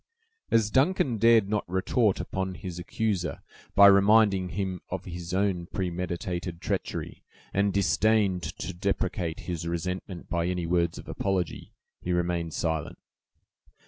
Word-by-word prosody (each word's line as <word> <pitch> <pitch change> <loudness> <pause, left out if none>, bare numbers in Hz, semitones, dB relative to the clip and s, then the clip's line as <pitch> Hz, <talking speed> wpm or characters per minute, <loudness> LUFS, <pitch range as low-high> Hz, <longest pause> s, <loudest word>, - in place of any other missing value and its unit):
As 110 -2 +3
Duncan 130 - +2
dared 115 -2 +5
not 105 0 0
retort 95 +3 +1
upon 95 -1 -3
his 90 -2 -7
accuser 95 -1 -2 0.3
by 100 - +9
reminding 100 -1 +5
him 95 -1 -3
of 95 0 -4
his 85 -1 -6
own 95 -2 0
premeditated 90 -1 -3
treachery, - - -3 0.3
and 100 +1 +2
disdained 100 +1 +2
to 85 +3 -5
deprecate 90 -2 -2
his 85 -2 -4
resentment 90 +2 -4
by 85 0 -1
any 90 -1 -1
words 85 -1 +1
of - - -10
apology, 95 -4 -2 0.3
he 90 - -1
remained 85 -2 -1
silent. 80 -3 -2
95 Hz, 130 wpm, -27 LUFS, 85-100 Hz, 0.3 s, by